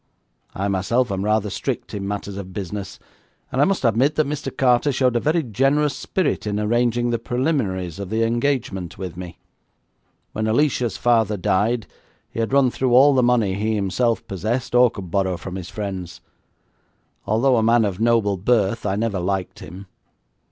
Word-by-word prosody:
I 100 +1 -1
myself 100 +5 0
am 95 0 -2
rather 105 -1 +1
strict - - -4
in 100 -1 -4
matters 100 -1 -4
of 95 -2 -7
business, 100 0 -5 0.5
and 130 - +1
I - - +6
must 195 -8 0
admit 125 +6 +2
that 155 - +2
Mr. 150 +1 -3
Carter 130 +1 +3
showed 130 -2 +1
a - - +3
very 160 +5 +1
generous 135 +5 +1
spirit 180 - -2
in 105 0 -1
arranging 120 +2 +1
the 115 - 0
preliminaries 115 - -2
of 100 -2 -5
the 110 +2 0
engagement 115 - -1
with 90 -4 -6
me. 90 -1 -8 1.0
When 110 0 -2
Alicia's 125 0 +1
father 115 -4 +2
died 105 +5 +1 0.5
he - - -6
had 115 +1 -1
run 135 -2 +4
through 125 -1 +1
all 140 +3 +7
the 130 - +3
money 120 -5 +2
he 110 +3 -1
himself 105 +4 0
possessed 110 +7 -3
or 125 0 +6
could 95 -6 -9
borrow 95 -2 0
from 90 +2 -8
his 90 -2 -6
friends. 95 -4 -6 1.1
Although 120 +5 +3
a - - +3
man 115 0 +4
of 100 -2 -3
noble 115 -4 +2
birth, 110 +1 +1
I 95 - 0
never 105 -2 -1
liked 95 +1 -3
him. 95 +2 -10
110 Hz, 175 wpm, -22 LUFS, 100-125 Hz, 1.1 s, all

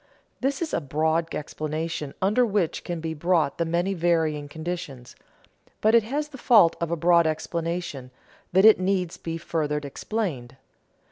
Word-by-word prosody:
_ - - -35 0.4
This 275 +5 0
is 315 - -5
a - - 0
broad 160 +3 0
explanation 155 0 -4
under 210 +6 +3
which 200 -7 0
can 175 -2 -4
be 160 0 -3
brought 160 -2 +1
the 170 - +1
many 175 +4 0
varying 160 -4 0
conditions; 155 -6 -6 0.6
but 220 +1 +3
it 235 - +7
has 290 +7 -3
the 270 -3 -11
fault 210 -10 +5
of 170 - -1
a 170 - 0
broad 170 0 +4
explanation, 165 -3 -3 0.4
that 190 +3 +5
it 220 -3 +8
needs 185 -2 -1
be 165 0 -5
further 155 -3 -2
explained. 145 - -4
170 Hz, 160 wpm, -25 LUFS, 155-190 Hz, 0.6 s, it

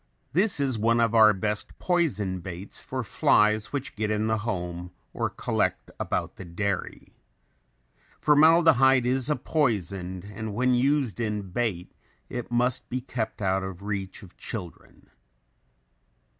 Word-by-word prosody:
This 190 +1 +2
is 130 -5 0
one 115 +2 +3
of 115 -1 +2
our 110 -2 +7
best 105 +1 -3
poison 105 - 0
baits 90 +2 -8
for - - -4
flies 105 +2 +2
which 140 -2 -4
get 105 -1 -1
in 105 0 0
the 110 0 +1
home 90 -5 -4 0.2
or - - -1
collect - - -1
about - - -2
the - - -7
dairy. 95 +3 -3 1.1
Formaldehyde 150 -4 +5
is 130 +2 0
a 150 - +2
poison 95 - -1
and 105 0 -6
when 125 +2 +2
used 130 -2 +1
in 105 -4 -3
bait 95 -5 -2 0.4
it 120 -1 -5
must 120 +1 0
be 130 - -2
kept 120 -4 -4
out 95 0 +1
of 95 0 -7
reach 100 0 -4
of 90 - -14
children. 90 -8 -8
110 Hz, 140 wpm, -26 LUFS, 95-125 Hz, 1.1 s, our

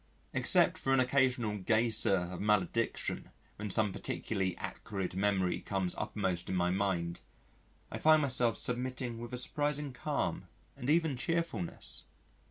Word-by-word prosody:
Except - - +3
for 135 - +1
an - - +3
occasional 125 -5 +2
geyser 110 0 +3
of 90 0 -4
malediction 105 +2 0 0.3
when 105 0 -4
some 105 0 +2
particularly 95 -1 -2
acrid 95 -3 -4
memory 95 -2 +1
comes 95 -3 -1
uppermost 95 -4 -2
in 95 - -1
my 90 0 +2
mind, 90 -3 -1 0.7
I - - -4
find 155 -1 +6
myself 125 -4 +2
submitting 125 -1 -2
with 120 0 -7
a 125 - -3
surprising 145 +2 -1
calm - - -2 0.3
and 130 0 -4
even 160 -3 +3
cheerfulness. 165 - -2
110 Hz, 135 wpm, -33 LUFS, 95-130 Hz, 0.7 s, find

